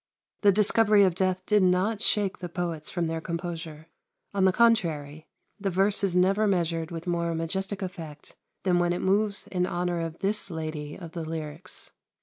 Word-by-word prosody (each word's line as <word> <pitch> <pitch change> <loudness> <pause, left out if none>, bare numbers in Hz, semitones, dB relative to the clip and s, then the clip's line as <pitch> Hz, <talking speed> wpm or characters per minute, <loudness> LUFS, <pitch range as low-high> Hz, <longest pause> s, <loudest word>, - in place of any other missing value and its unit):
The 205 - +6
discovery 210 +1 +5
of 185 -3 +3
death 185 +1 0
did 210 -1 +3
not 185 +4 +2
shake 205 -4 +1
the 175 - -5
poets 170 -3 -3
from 175 -2 -1
their 160 0 -2
composure. 165 -2 -5 0.5
On 195 -1 +2
the 190 - +5
contrary, 160 -10 +1 0.3
the 195 -1 -1
verse 195 +3 +2
is 190 -3 +1
never 195 +4 +3
measured 165 -4 0
with 170 -1 -6
more 170 -1 -1
majestic 190 +4 -3
effect 165 -5 -8 0.3
than 180 -2 +3
when 175 0 +2
it 175 - -3
moves 200 +1 +1
in 180 -1 0
honour 175 -1 -1
of 165 0 -4
this 205 +1 -1
Lady 155 -3 -5
of 170 -3 -9
the 165 -1 -5
lyrics. 160 +2 -6
180 Hz, 175 wpm, -27 LUFS, 165-195 Hz, 0.5 s, The